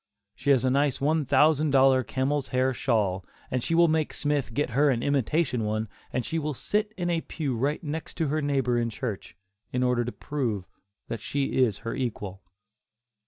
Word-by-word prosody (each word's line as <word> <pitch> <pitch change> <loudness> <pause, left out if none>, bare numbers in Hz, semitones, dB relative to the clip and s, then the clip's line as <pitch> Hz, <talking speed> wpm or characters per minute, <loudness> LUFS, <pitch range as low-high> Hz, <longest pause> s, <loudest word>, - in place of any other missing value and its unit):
She - - -4
has 130 -2 +4
a 130 - +3
nice 140 -1 +2
one 150 +2 +1
thousand 150 +2 +4
dollar 135 -1 +5
camel's 135 +3 -1
hair 130 +1 +1
shawl, 105 -8 0 0.3
and 125 -1 0
she 165 - 0
will 170 0 +6
make 155 -1 0
Smith 145 -5 0
get 130 +2 -1
her 145 +5 +4
an 120 -3 0
imitation 140 -2 +1
one 110 +1 -1 0.2
and 125 - -1
she 165 - -1
will 150 -2 -3
sit 210 - -1
in 175 -1 -1
a 165 -1 +1
pew 145 -7 -3
right 140 +8 -1
next 155 +1 -5
to 160 -4 0
her 155 +2 0
neighbor 135 -4 +1
in 115 0 0
church, 110 -6 -5 0.4
in 125 0 0
order 125 -1 +2
to 120 - -4
prove 120 -12 -3 0.4
that 115 - -4
she 135 +3 0
is 110 -6 +1
her 115 - -2
equal. 105 -6 -4
135 Hz, 195 wpm, -27 LUFS, 120-150 Hz, 0.4 s, will